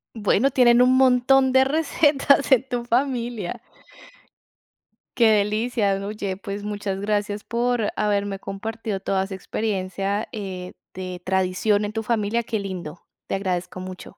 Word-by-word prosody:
Bueno, 220 +5 +2
tienen 245 -1 +5
un 255 +1 +4
montón 260 +1 +4
de 265 0 +6
recetas 285 -1 +2
en 255 -3 +6
tu 245 -2 -2
familia. 240 -3 -1 1.5
Qué 230 -2 +4
delicia. 210 -1 +1
Oye, 205 -3 -4
pues 200 0 -6
muchas 205 -2 -4
gracias, 205 0 -1
por 235 -2 0
haberme 205 -2 0
compartido 215 +1 -5
toda 190 0 0
esa 195 0 -7
experiencia, 195 0 -2
eh, 190 -5 -6 0.2
de 185 -1 -6
tradición 190 +3 +1
en 205 - -4
tu 220 0 -3
familia. 230 +1 0
Qué 220 -2 -2
lindo. 180 -4 -6 0.3
Te - - -3
agradezco 185 -1 -3
mucho. 185 0 -8
210 Hz, 135 wpm, -23 LUFS, 195-240 Hz, 1.5 s, de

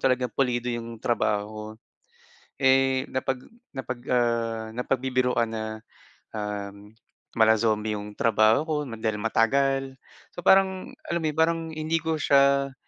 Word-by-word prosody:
talaga 130 -1 +2
pulido 125 -2 0
yung 115 0 -5
trabaho 110 -3 0
ko. 105 0 -6 1.0
Eh, 135 0 +3
napag 130 0 -2 0.3
napag, 130 -2 -5
ah, 115 -2 0
napagbibiruan 125 -1 0
na, 110 -1 -4 0.7
ah, 105 -1 -4 0.6
mala 110 0 +6
zombie 110 -1 +1
yung 105 0 -6
trabaho 110 -2 +4
ko 155 - 0 0.2
dahil 110 -1 -1
matagal. 135 +4 +1 0.4
So 175 - -6
parang 190 -1 +3 0.2
alam 170 - -1
mo - - +1
yun 155 - -14
parang 165 +1 +3
hindi 155 +1 -2
ko 160 -1 0
siya 140 -1 +3
125 Hz, 130 wpm, -26 LUFS, 110-140 Hz, 1.0 s, mala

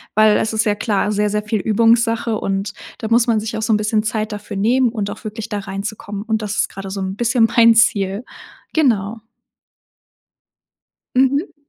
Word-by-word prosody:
weil 215 0 +5
es 220 - -1
ist 220 0 +1
ja 210 - +2
klar 210 -1 0
sehr, 210 0 +1
sehr 210 +1 -1
viel 210 0 -1
Übungssache 230 +1 +2
und 195 +1 -2 0.3
da 220 - -4
muss 230 +1 +3
man 225 -2 +2
sich 220 +1 -4
auch - - -3
so 220 0 +1
'n - - +4
bisschen 215 +1 0
Zeit 215 0 -2
dafür 205 -1 -6
nehmen 245 +5 +2
und 215 -3 -3
auch - - -10
wirklich 215 0 -6
da 205 - -2
reinzukommen, 200 +1 -6
und 220 -1 -1
das 210 0 -3
ist - - +1
gerade 195 0 -8
so 195 0 -4
'n 190 0 -3
bisschen 235 0 +3
mein 230 -1 +6
Ziel. 200 -2 +2 0.5
Genau. 225 -7 +1 1.9
Mhm. 280 +7 +1
215 Hz, 190 wpm, -19 LUFS, 205-230 Hz, 1.9 s, mein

